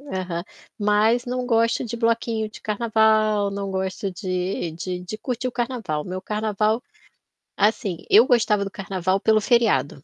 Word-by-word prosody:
Aham. 185 Hz, -11 st, -4 dB, 0.4 s
Mas 215 Hz, +3 st, +2 dB
não 250 Hz, 0 st, -3 dB
gosto 230 Hz, -1 st, +2 dB
de 235 Hz, 0 st, -5 dB
bloquinho 230 Hz, -1 st, 0 dB
de -, -, -13 dB
carnaval, 215 Hz, -1 st, +2 dB
não 200 Hz, 0 st, -4 dB
gosto 190 Hz, +1 st, -3 dB
de 185 Hz, -2 st, -3 dB
de 180 Hz, +2 st, -5 dB
de 180 Hz, +4 st, -7 dB
curtir 250 Hz, +1 st, -3 dB
o -, -, -7 dB
carnaval. 235 Hz, -12 st, -3 dB
Meu 185 Hz, +1 st, -5 dB
carnaval, 215 Hz, +2 st, 0 dB, 0.8 s
assim, 200 Hz, -4 st, 0 dB
eu 220 Hz, +4 st, +7 dB
gostava 220 Hz, -4 st, +3 dB
do 195 Hz, -, -5 dB
carnaval 190 Hz, 0 st, -1 dB
pelo 215 Hz, +1 st, +3 dB
feriado, 205 Hz, -, +2 dB
210 Hz, 150 wpm, -23 LUFS, 190-230 Hz, 0.8 s, eu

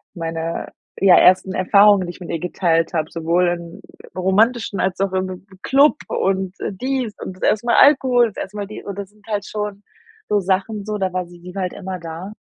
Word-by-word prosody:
meine, 165 Hz, -1 st, -4 dB, 0.3 s
ja, 190 Hz, -2 st, +6 dB
ersten 185 Hz, +1 st, +5 dB
Erfahrungen, 200 Hz, 0 st, +4 dB
die -, -, -4 dB
ich 175 Hz, -, -15 dB
mit 175 Hz, -, -9 dB
ihr 165 Hz, -, -2 dB
geteilt 165 Hz, -1 st, 0 dB
habe, 160 Hz, -2 st, -1 dB
sowohl 170 Hz, +2 st, +1 dB
im 170 Hz, -1 st, -6 dB, 0.4 s
romantischen 200 Hz, +2 st, +1 dB
als 185 Hz, 0 st, -1 dB
auch 195 Hz, -1 st, 0 dB
im 185 Hz, 0 st, -3 dB, 0.2 s
Club 285 Hz, +3 st, +4 dB
und 190 Hz, -1 st, -1 dB, 0.2 s
dies 250 Hz, +2 st, -3 dB
und 185 Hz, -, -7 dB
das -, -, -11 dB
erste 220 Hz, +3 st, +1 dB
mal 235 Hz, -, +3 dB
Alkohol, 260 Hz, -4 st, +5 dB
das -, -, -18 dB
erste 210 Hz, +2 st, -12 dB
Mal 205 Hz, -, -3 dB
die 215 Hz, -, -9 dB
und 200 Hz, -1 st, -7 dB
das 200 Hz, -2 st, -6 dB
sind 210 Hz, 0 st, -26 dB
halt 205 Hz, -2 st, -2 dB
schon 210 Hz, -1 st, -5 dB, 0.4 s
so 205 Hz, -, +2 dB
Sachen 195 Hz, +2 st, -1 dB
so, 210 Hz, 0 st, -3 dB
da 190 Hz, -2 st, -2 dB
war 180 Hz, -1 st, -2 dB
sie 175 Hz, +1 st, -12 dB
halt 185 Hz, -2 st, -2 dB
immer 185 Hz, -1 st, -6 dB
da. 170 Hz, +4 st, -7 dB
190 Hz, 200 wpm, -20 LUFS, 180-210 Hz, 0.4 s, ja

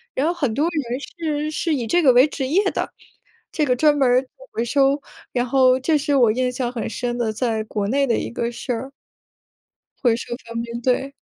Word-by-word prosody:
然 270 Hz, -, +1 dB
后 340 Hz, -, +1 dB
很 285 Hz, -10 st, -1 dB
多 290 Hz, +7 st, +1 dB
人 270 Hz, -7 st, -3 dB
是 305 Hz, -1 st, -3 dB
是 315 Hz, 0 st, 0 dB
以 245 Hz, -4 st, -2 dB
这 350 Hz, +6 st, +3 dB
个 270 Hz, -6 st, +6 dB
为 250 Hz, +2 st, +7 dB
职 270 Hz, -2 st, -3 dB
业 360 Hz, +9 st, +3 dB
的， -, -, -3 dB, 0.6 s
这 305 Hz, -, 0 dB
个 250 Hz, -3 st, +2 dB
专 295 Hz, +3 st, +3 dB
门 270 Hz, -2 st, +3 dB
儿 250 Hz, +1 st, +4 dB
做 260 Hz, -, -18 dB, 0.2 s
回 230 Hz, -, -1 dB
收， 275 Hz, +3 st, +2 dB, 0.3 s
然 245 Hz, -1 st, +1 dB
后 255 Hz, 0 st, +4 dB
这 305 Hz, +4 st, +2 dB
是 290 Hz, 0 st, 0 dB
我 240 Hz, -5 st, +5 dB
印 250 Hz, +3 st, 0 dB
象 250 Hz, -1 st, -2 dB
很 235 Hz, -3 st, -4 dB
深 240 Hz, +2 st, -3 dB
的 225 Hz, -3 st, -1 dB
在 220 Hz, -1 st, -1 dB
国 210 Hz, -1 st, -2 dB
内 275 Hz, +3 st, +2 dB
的 235 Hz, -, +2 dB
一 -, -, -4 dB
个 235 Hz, 0 st, -2 dB
事 240 Hz, -, -5 dB
儿。 250 Hz, +4 st, -5 dB, 1.1 s
回 240 Hz, -3 st, +4 dB
收 240 Hz, 0 st, -5 dB
方 230 Hz, 0 st, -4 dB
便， 235 Hz, 0 st, -6 dB
对。 260 Hz, +3 st, 0 dB
255 Hz, 240 characters per minute, -22 LUFS, 240-290 Hz, 1.1 s, 为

